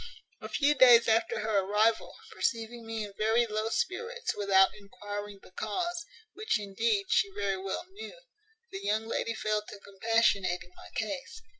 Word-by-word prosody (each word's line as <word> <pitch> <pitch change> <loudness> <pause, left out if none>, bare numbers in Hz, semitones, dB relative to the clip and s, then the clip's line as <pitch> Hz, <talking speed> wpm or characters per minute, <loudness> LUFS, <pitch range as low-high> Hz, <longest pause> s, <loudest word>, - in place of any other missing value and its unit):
"A - - -7
few 290 0 +3
days 245 -4 +7
after 225 -1 +2
her 215 -1 +1
arrival, 210 +3 +1 0.2
perceiving 230 0 -3
me 225 -1 -3
in 205 -1 -8
very 225 +2 +3
low 215 0 -2
spirits, 465 - -2
without 195 -2 +4
enquiring 205 0 -8
the - - -16
cause, 345 - -3 0.3
which, 430 - -1
indeed, 205 +1 0
she 200 - +3
very 200 -1 0
well 195 - -4
knew, 440 +5 -10 0.5
the 385 - -5
young 215 +2 0
lady 230 0 -2
fell 215 -1 0
to 210 -1 -11
compassionating 200 -3 0
my - - -13
case. 265 +5 -4
220 Hz, 155 wpm, -30 LUFS, 205-235 Hz, 0.5 s, days